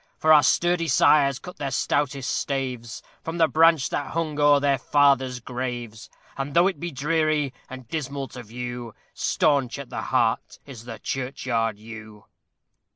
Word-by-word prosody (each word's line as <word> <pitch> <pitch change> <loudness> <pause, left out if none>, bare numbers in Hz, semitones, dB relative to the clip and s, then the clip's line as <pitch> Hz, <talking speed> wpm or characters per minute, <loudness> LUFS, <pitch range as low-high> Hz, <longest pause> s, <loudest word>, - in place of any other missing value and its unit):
For 155 0 +5
our 150 - +8
sturdy 175 +2 +2
sires 140 -4 +4
cut 180 +4 -11
their 140 - -3
stoutest 135 0 -1
staves 125 -5 -4 0.2
From 165 +1 -5
the 165 -1 +4
branch 165 -3 +4
that 145 - -3
hung 155 -3 -2
o'er 145 -1 +5
their 140 -1 +1
fathers' 135 -3 +2
graves; 120 -3 -6 0.3
And 135 +1 -5
though 170 +1 +6
it 190 -6 0
be 175 - -4
dreary 155 -1 0 0.2
and 130 -2 -9
dismal 140 -1 -4
to 125 - -9
view, 120 0 -7 0.2
Staunch 140 -5 +1
at 140 -3 -9
the - - -4
heart 115 -3 0
is 120 -5 -11
the 115 -2 -7
churchyard 120 -4 -2
yew. 110 -1 -11
135 Hz, 160 wpm, -24 LUFS, 120-150 Hz, 0.3 s, our